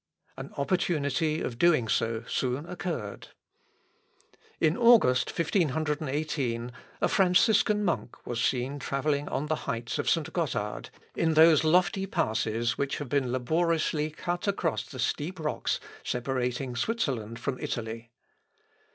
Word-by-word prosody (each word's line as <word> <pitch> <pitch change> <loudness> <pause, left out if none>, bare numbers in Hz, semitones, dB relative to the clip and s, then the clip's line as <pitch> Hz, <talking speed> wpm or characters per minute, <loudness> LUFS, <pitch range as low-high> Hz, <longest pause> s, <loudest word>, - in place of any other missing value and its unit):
An - - -7
opportunity 155 -1 0
of 115 -1 -4
doing 155 -9 +4
so 115 +1 0
soon 130 +3 -1
occurred. 170 - -5 1.3
In 160 +1 +3
August, 230 - +5
1518, 150 - -1 0.3
a - - +4
Franciscan 205 +3 +3
monk 170 -8 -1
was 120 -1 -2
seen 130 +4 0
travelling 140 +2 -1
on 140 - -2
the 155 +1 0
heights 115 0 -3
of - - 0
St. - - 0
Gothard, - - -2 0.3
in 160 -1 +1
those 160 -1 +7
lofty 180 +4 +2
passes 115 - 0
which 140 0 -1
have 145 -4 -6
been 130 -2 +1
laboriously 155 +3 +1
cut 175 +4 -4
across 185 -5 -1
the 130 - -10
steep 155 +8 -2
rocks 155 -1 -1 0.2
separating 125 0 -2
Switzerland 120 - -2
from 130 0 -3
Italy. 115 0 -4
145 Hz, 125 wpm, -28 LUFS, 125-165 Hz, 1.3 s, those